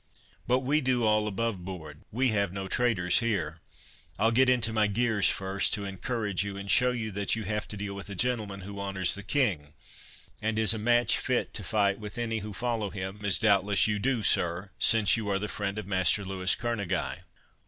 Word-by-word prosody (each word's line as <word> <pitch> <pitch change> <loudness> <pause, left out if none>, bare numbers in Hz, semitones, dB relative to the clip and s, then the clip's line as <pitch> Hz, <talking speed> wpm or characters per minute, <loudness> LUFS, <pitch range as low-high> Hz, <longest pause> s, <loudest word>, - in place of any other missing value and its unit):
But 125 +1 +2
we 145 +4 +1
do 125 -2 +1
all 105 -1 +2
above 105 -2 -2
board—we 90 - -3
have 100 -4 0
no 95 0 -5
traitors 95 -6 +2
here. 85 -9 -2 0.6
I'll 110 +3 +3
get 130 +2 +4
into 120 -3 +2
my 110 -1 +3
gears 110 -1 +2
first, 95 +2 0
to 100 -2 -5
encourage 100 0 -1
you, 100 -1 -5
and 100 0 -3
show 125 - +5
you 115 -3 -3
that 100 +2 -1
you 110 - -4
have 105 +1 -3
to 105 - -5
deal 100 0 -5
with 100 +1 -8
a 100 - -6
gentleman, 110 -3 -1
who 100 +1 -8
honours 95 -2 0
the 100 - -3
King, 100 - -1 0.7
and 110 0 -1
is 110 0 +3
a 110 - -4
match 120 +2 +3
fit 125 -2 -1
to 105 - -3
fight 100 -1 +1
with 105 0 -7
any 115 -2 -2
who 105 +1 -7
follow 115 -1 -2
him, 95 +1 -6
as 100 -2 +2
doubtless 100 -2 +3
you 105 -1 0
do, 125 0 0
sir, 90 +1 +1
since 110 -1 +4
you 110 -2 -3
are 100 - +1
the 105 +2 -3
friend 100 -1 -4
of 105 - -4
Master 95 +1 +2
Louis 95 -1 +1
Kerneguy." 100 -6 -2
105 Hz, 205 wpm, -28 LUFS, 95-115 Hz, 0.7 s, show